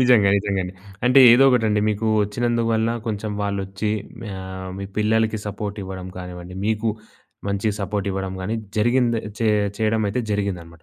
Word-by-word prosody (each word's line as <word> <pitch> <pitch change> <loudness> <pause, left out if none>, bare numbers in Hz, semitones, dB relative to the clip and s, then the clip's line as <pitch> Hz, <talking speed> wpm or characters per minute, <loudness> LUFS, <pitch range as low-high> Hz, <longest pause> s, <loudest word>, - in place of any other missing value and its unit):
నిజంగా. 125 -6 +5
నిజంగండి. 95 -2 -1 0.3
అంటే 125 +2 +6
ఏదో 130 +3 +6
ఒకటండి. 110 -4 +2
మీకు 110 +1 -1 0.2
ఒచ్చినందువల్ల 115 +1 0 0.2
కొంచెం 105 -1 -2
వాళ్ళచ్చి 100 +1 -2 0.5
ఆహ్, 95 0 -7
మీ 100 - -4
పిల్లలకి 110 0 +2
సపోర్ట్ 105 0 -4
ఇవ్వడం 95 -1 -6
గానివ్వండి, 90 0 -8
మీకు 110 +1 +1 0.6
మంచి 100 +2 0
సపోర్ట్ 100 +1 -2
ఇవ్వడం 95 0 -3
గానీ 105 +5 -2 0.2
జరిగింద 120 +2 +3 0.3
చే 115 - +3 0.3
చేయడమయితే 110 +1 +1
జరిగిందన్నమాట 90 -5 -3
105 Hz, 135 wpm, -22 LUFS, 95-110 Hz, 0.6 s, అంటే